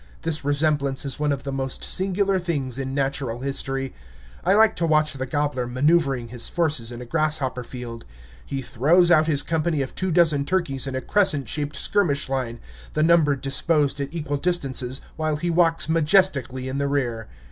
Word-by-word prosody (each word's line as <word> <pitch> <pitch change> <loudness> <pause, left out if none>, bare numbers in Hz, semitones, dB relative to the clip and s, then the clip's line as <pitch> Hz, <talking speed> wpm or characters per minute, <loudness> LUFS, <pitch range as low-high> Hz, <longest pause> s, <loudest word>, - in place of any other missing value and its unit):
This 160 -2 -2
resemblance 145 -1 0
is 135 -1 -3
one 150 -1 +1
of 140 -1 -3
the 140 - -4
most 135 -1 -3
singular 195 0 +1
things 140 -8 -3
in 135 0 -4
natural 135 -3 -2
history. 135 -1 -1 0.5
I 190 +3 +3
like 220 0 +4
to 170 - 0
watch 155 -1 +2
the 130 -1 -5
gobbler 145 -2 -1
maneuvering 135 -1 +1
his 120 -1 0
forces 155 -9 0
in 120 +1 -7
a - - -11
grasshopper 150 -3 0
field. 120 -1 -8 0.4
He 135 -1 -5
throws 150 +9 +3
out 155 -2 +5
his 145 -3 +2
company 160 -1 0
of 130 - -8
two 185 - -2
dozen 160 -4 +3
turkeys 145 -5 -1
in 135 - -4
a 130 - -2
crescent 155 - +1
shaped 145 +4 -3
skirmish 140 -2 +1
line, 130 -3 -3 0.3
the 155 - +1
number 160 -3 +4
disposed 140 +2 +1
at 140 0 -4
equal 150 -3 -3
distances, 135 -6 -1 0.2
while 155 -1 -1
he 170 +3 -2
walks 165 -2 +3
majestically 150 -6 +2
in 130 +1 -3
the 140 - 0
rear. 120 -6 -2
145 Hz, 180 wpm, -23 LUFS, 130-165 Hz, 0.5 s, out